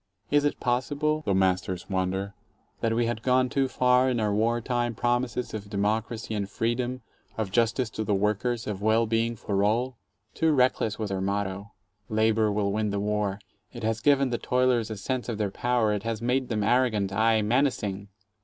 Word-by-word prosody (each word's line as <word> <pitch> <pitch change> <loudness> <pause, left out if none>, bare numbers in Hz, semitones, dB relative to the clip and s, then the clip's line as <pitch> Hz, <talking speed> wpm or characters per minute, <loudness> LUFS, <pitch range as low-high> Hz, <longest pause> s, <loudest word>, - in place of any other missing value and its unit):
Is 145 0 +3
it 145 - 0
possible, 145 +5 0
the 100 - +2
masters 95 -1 0
wonder, 95 +1 -2 0.5
that 115 0 0
we 120 0 +2
had 115 -1 -2
gone 130 +1 +2
too 135 0 +1
far 125 0 +3
in 125 -2 0
our 105 -2 +1
war 115 +3 +1
time 120 -1 -1
promises 120 +1 -1
of 105 -2 -6
democracy 110 +3 -1
and 100 -2 -2
freedom, 120 +3 -2 0.3
of 110 -4 -2
justice 115 +2 +1
to 110 - -3
the 105 -2 +1
workers, 105 +4 0
of 100 -2 -4
well 110 +2 +3
being 115 +1 0
for 100 -2 -1
all? 120 +4 0 0.3
Too 160 -1 +2
reckless 125 -5 +2
was 105 -3 -3
our 95 -1 -2
motto, 100 +1 -3 0.4
"Labor 110 0 +2
will 100 -1 0
win 105 +1 0
the 100 0 -1
war": 105 -1 -1 0.3
it 120 -2 -8
has 110 0 -1
given 140 -2 +3
the 120 - -1
toilers 125 -3 +1
a 110 - -5
sense 125 +5 -3
of 115 - -2
their 105 -2 -1
power, 120 -1 +1
it 105 - -2
has 115 0 -3
made 125 +3 0
them 105 -3 0
arrogant, 110 -4 +2
aye, 110 +1 +3
menacing. 105 -5 0
110 Hz, 190 wpm, -27 LUFS, 105-125 Hz, 0.5 s, Is